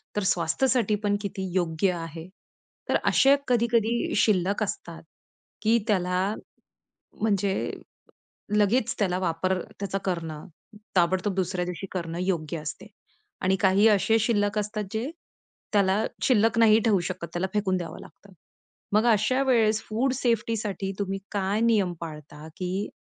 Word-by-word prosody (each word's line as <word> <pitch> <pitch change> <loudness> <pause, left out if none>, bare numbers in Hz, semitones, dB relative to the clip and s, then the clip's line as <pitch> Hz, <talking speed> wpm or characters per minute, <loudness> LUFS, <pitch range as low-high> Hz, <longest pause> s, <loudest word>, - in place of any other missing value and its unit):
तर 210 - 0
स्वास्थ्यसाठी 210 +7 +1
पण 205 0 +2
किती 195 -1 -4
योग्य 175 +1 +1
आहे. 165 -1 -7 0.6
तर - - +2
असे 275 +1 +5
कधी-कधी 235 -1 +1
शिल्लक 200 0 +2
असतात 170 -4 -6 0.6
की 225 +2 +4
त्याला 180 -3 +1 1.0
म्हणजे 200 -2 +1 1.0
लगेच 210 +3 +2
त्याला 185 -3 +1
वापर 185 +1 0 0.2
त्याचा 195 -1 -2
करणं, 165 -4 -3 0.5
ताबडतोब 185 +3 +2
दुसऱ्या 185 -1 -1
दिवशी 180 +2 -5
करणं 170 -2 -4
योग्य 170 -3 -2
असते. 150 0 -7 0.6
आणि 190 +1 +2
काही 195 +2 +4
असे 220 +2 +3
शिल्लक 210 -2 +1
असतात, 210 0 -2
जे 230 +6 -2 0.6
त्याला 200 +1 +3 0.2
शिल्लक 230 -1 +3
नाही 220 -1 +6
ठेवू 210 -5 +3
शकत. 180 0 -4
त्याला 175 +2 0
फेकून 195 -3 +1
द्यावं 170 -3 -6
लागतं. 200 - -16 0.6
मग 215 +2 +4
अशा 225 +6 +2
वेळेस 220 -4 +3
फूड 245 +5 +1
सेफ्टीसाठी 220 -5 -1
तुम्ही 195 -1 -2
काय 200 +1 0
नियम 215 -6 +3
पाळता? 150 -2 -9
की 185 +2 -3
200 Hz, 130 wpm, -26 LUFS, 180-220 Hz, 1.0 s, नाही